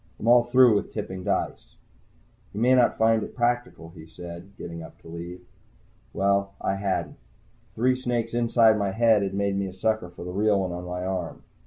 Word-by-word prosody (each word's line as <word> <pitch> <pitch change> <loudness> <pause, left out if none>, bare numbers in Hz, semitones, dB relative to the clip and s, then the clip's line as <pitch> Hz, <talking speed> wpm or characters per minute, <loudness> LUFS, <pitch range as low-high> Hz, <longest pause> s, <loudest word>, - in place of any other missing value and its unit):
I'm 115 - -4
all 120 0 +7
through 120 -4 +5
tipping 95 -3 -6
dice." - - -3 0.8
"You - - -3
may 125 +3 +4
not 125 -2 +3
find 110 0 +3
it - - -7
practical," 120 -9 -1
he 80 -2 -13
said, 85 +3 -10
getting 85 -1 -7
up - - -12
to - - -15
leave. 85 +2 -8 0.7
Well, 100 0 +1
I - - -1
hadn't. 95 -1 -2 0.6
Three 125 +3 +2
snakes 120 -3 -2
inside 115 -2 +4
my 100 -1 -1
head 115 -1 +4
had 100 -1 -2
made 100 0 0
me 100 0 -1
a 95 - -8
sucker 110 -1 -1
for 85 0 -10
the 90 - -5
real 100 +1 +2
one 95 -1 -2
on 90 +1 -6
my 90 0 -4
arm. 95 -3 -4
100 Hz, 190 wpm, -25 LUFS, 90-115 Hz, 0.8 s, all